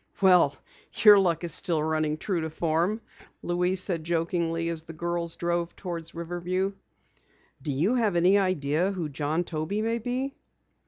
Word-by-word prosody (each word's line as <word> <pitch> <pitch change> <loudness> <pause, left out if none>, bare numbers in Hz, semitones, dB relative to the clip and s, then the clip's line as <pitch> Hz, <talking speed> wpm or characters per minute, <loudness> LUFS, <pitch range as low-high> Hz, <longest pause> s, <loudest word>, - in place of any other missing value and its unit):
"Well, 180 -7 +5 0.4
your 210 -2 +7
luck 175 -3 +1
is 170 - -2
still 165 -5 +1
running 155 -1 0
true 175 +1 -2
to 160 - -3
form," 170 +7 0 0.4
Louise 180 +1 +1
said 170 -5 -1
jokingly, 165 0 -1
as 165 -1 -2
the 165 +1 -10
girls 170 0 -3
drove 170 0 -2
toward 170 -3 -6
Riverview. 175 +3 -2 0.9
"Do 150 - -3
you 160 - +1
have 225 -7 +1
any 180 +4 +5
idea 175 -2 +1
who 170 -5 -3
John 150 +4 -1
Toby 170 +6 -3
may 230 +1 0
be?" 255 +4 -3
170 Hz, 155 wpm, -27 LUFS, 160-190 Hz, 0.9 s, your